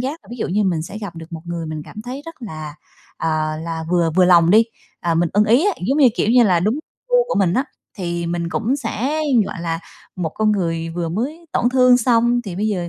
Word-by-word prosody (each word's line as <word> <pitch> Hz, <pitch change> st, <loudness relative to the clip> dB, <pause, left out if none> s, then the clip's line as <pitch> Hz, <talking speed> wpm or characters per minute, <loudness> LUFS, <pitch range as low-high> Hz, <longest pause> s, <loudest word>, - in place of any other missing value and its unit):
giác 280 Hz, +6 st, -3 dB
là -, -, -22 dB
ví 240 Hz, -, -6 dB
dụ -, -, -3 dB
như 205 Hz, +3 st, +1 dB
mình 170 Hz, -4 st, 0 dB
sẽ 205 Hz, +6 st, -7 dB
gặp 195 Hz, -6 st, -7 dB
được 165 Hz, +1 st, -10 dB
một 160 Hz, -1 st, -6 dB
người 170 Hz, -1 st, -4 dB
mình 155 Hz, -1 st, -5 dB
cảm 215 Hz, -, -9 dB
thấy 260 Hz, +4 st, -6 dB
rất 330 Hz, -, -8 dB
là, 155 Hz, -7 st, -7 dB, 0.4 s
à, 155 Hz, -1 st, -1 dB
là 165 Hz, -1 st, -4 dB
vừa 170 Hz, -2 st, +2 dB
vừa 180 Hz, +3 st, +4 dB
lòng 170 Hz, -2 st, +5 dB
đi, 220 Hz, +3 st, +6 dB, 0.4 s
à, 170 Hz, -1 st, 0 dB
mình 170 Hz, 0 st, +2 dB
ưng 210 Hz, +2 st, +4 dB
ý 245 Hz, -, +4 dB
á, 410 Hz, -, +3 dB
giống 275 Hz, +3 st, +1 dB
như, 265 Hz, -4 st, +7 dB
kiểu -, -, +1 dB
như 245 Hz, 0 st, +6 dB
là, 180 Hz, -4 st, +3 dB
đúng 210 Hz, +6 st, +1 dB, 0.3 s
gu -, -, +3 dB
của -, -, -1 dB
mình 185 Hz, -2 st, +2 dB
á, 265 Hz, -, +1 dB, 0.3 s
thì 170 Hz, -1 st, -3 dB
mình 170 Hz, 0 st, -2 dB
cũng 230 Hz, +9 st, 0 dB
sẽ, 275 Hz, +4 st, -2 dB, 0.3 s
gọi 170 Hz, -, -6 dB
là, 165 Hz, -1 st, -2 dB, 0.4 s
một 170 Hz, -3 st, -1 dB
con 215 Hz, -1 st, +2 dB
người 165 Hz, -4 st, -1 dB
vừa 170 Hz, 0 st, -3 dB
mới 285 Hz, -, -4 dB
tổn 240 Hz, -, +2 dB
thương 255 Hz, -1 st, +5 dB
xong 240 Hz, 0 st, +3 dB
thì 185 Hz, -5 st, -6 dB
bây 215 Hz, +2 st, 0 dB
giờ, 180 Hz, -4 st, -2 dB
190 Hz, 250 wpm, -20 LUFS, 170-240 Hz, 0.4 s, như